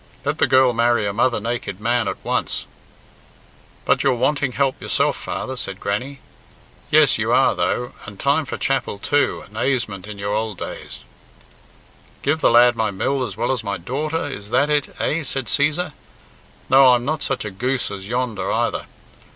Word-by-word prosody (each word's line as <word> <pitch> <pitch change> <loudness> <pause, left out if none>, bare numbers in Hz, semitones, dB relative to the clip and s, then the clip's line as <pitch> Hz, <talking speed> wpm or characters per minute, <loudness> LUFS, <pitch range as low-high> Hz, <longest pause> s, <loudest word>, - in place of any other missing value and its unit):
Let - - -1
the - - +4
girl 130 -1 +5
marry 120 -1 +2
a 100 - -1
mother 120 +2 +2
naked 115 -3 -4
man 120 0 +1
at - - -2
once." - - -1 1.2
"But - - +3
you're 135 -2 +3
wanting 140 +1 0
help 135 0 0
yourself, - - +1
father," 130 - -5
said 95 -6 -5
Grannie. 130 +7 -3 0.7
"Yes, - - +5
you - - 0
are - - +4
though, 125 0 -1 0.2
and 100 -2 -10
time 145 +3 +2
for 130 - -5
chapel 135 -6 -1
too 145 +8 0
and 105 - -18
aisément 110 -6 -1
in 105 -1 -7
your 100 +1 -2
old 110 -2 -2
days - - -7 0.6
" - - -29
"Give 155 +3 +1
the - - +5
lad 120 +1 +6
my 110 -1 0
mill 130 +7 -1
as 100 -6 -5
well 120 +3 0
as 125 -3 -2
my 100 -1 -2
daughter, 145 - -2
is 105 -8 -7
that 145 +6 +2
it, 145 -1 0
eh?" 165 - 0
said 135 -3 -3
Cæsar. 150 +4 0 0.7
"No, 130 -1 +7
I'm 120 0 -2
not 155 +1 -1
such 135 -4 -2
a 105 - -4
goose 125 +6 -1
as 95 0 -7
yonder, 120 -2 -2
either. - - -1
125 Hz, 185 wpm, -21 LUFS, 105-135 Hz, 1.2 s, No